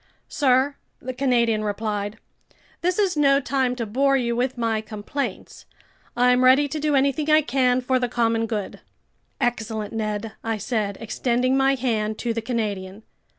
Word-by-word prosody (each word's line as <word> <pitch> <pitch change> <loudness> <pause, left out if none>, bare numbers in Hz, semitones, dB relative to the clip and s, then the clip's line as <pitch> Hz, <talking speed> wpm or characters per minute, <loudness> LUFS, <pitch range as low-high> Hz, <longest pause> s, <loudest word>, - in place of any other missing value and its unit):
"Sir," 270 0 +2 0.2
the 255 +1 -5
Canadian 240 -4 +1
replied, 205 0 -3 0.6
"this 360 +1 0
is 390 -5 +1
no 280 -2 +4
time 260 -2 0
to 235 -2 -3
bore 275 +6 +2
you 235 -2 -1
with 250 +1 -1
my 225 -2 0
complaints. 215 +6 -6 0.5
I'm 250 +1 +4
ready 265 +3 +5
to 305 - -3
do 300 -1 +1
anything 280 +3 +1
I 310 0 +5
can 255 -1 +2
for 255 +1 +1
the 245 -1 -1
common 230 -1 +1
good." 210 -3 -4 0.6
"Excellent, 220 -3 -2
Ned," 215 0 -3
I 225 -1 -1
said, 210 -2 -2
extending 245 +3 0
my 270 0 +3
hand 220 -4 -1
to 235 -1 -2
the 230 - -3
Canadian. 210 -4 -3
245 Hz, 155 wpm, -23 LUFS, 220-270 Hz, 0.6 s, ready